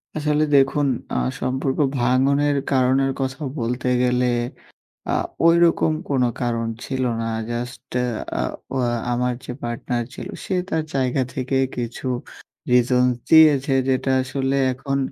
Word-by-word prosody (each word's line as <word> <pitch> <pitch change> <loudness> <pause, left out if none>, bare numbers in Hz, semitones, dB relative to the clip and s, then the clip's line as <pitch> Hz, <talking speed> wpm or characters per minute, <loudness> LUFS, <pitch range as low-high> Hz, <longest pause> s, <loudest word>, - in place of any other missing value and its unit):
আসলে 150 0 +1
দেখুন 140 +1 +3 0.3
আ - - 0 0.2
সম্পর্ক 130 +1 -1 0.2
ভাঙনের 140 +4 +2 0.2
কারণের 135 +1 +3
কথা 135 +2 -3 0.2
বলতে 125 +2 -2 0.2
গেলে 125 0 +2 0.8
আ - - +1 0.4
ওইরকম 165 -1 +4 0.2
কোন 135 -3 +2 0.2
কারণ 115 -1 -1 0.2
ছিল 130 -1 -2 0.2
না। - - -2 0.2
জাস্ট 125 +3 -5
এ - - +1 0.4
আ - - 0 0.3
ওয়া 125 -2 +1 0.2
আমার 125 +1 0
যে - - -5
পার্টনার 120 0 -2
ছিল, - - -7 0.2
সে 190 - -1
তার 160 -1 0
জায়গা 130 0 +1
থেকে 130 +1 -1 0.2
কিছু 120 +2 -4 0.6
রিজনস 125 0 +3
দিয়েছে। 150 -4 +6 0.2
যেটা 130 0 +1
আসলে 135 +1 -1 0.2
এখন 135 +2 -3
130 Hz, 130 wpm, -22 LUFS, 125-140 Hz, 0.8 s, দিয়েছে